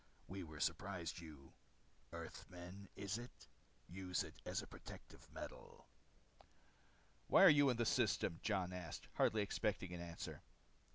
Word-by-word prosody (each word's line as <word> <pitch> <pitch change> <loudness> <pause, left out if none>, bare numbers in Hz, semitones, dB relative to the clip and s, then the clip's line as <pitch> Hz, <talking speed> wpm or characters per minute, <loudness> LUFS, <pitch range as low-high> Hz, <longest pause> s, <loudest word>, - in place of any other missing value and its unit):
We 95 +1 -4
were 80 -3 -7
surprised 85 +1 -1
you 75 -5 -11 0.6
earthmen, 90 +3 -8
is 100 +3 -2
it? 120 +1 -10 0.4
use 90 0 -1
it - - -8
as - - 0
protective - - -11
metal." - - -8 1.4
"Why - - +8
are 195 - +12
you 145 -2 +7
in 125 - +2
this 120 -1 +3
system?" 95 -7 +2
Jon 95 -4 +1
asked, 90 -3 -6
hardly 110 -1 +4
expecting 100 -2 0
an 85 - -4
answer. 85 -1 -5
95 Hz, 130 wpm, -42 LUFS, 85-105 Hz, 1.4 s, are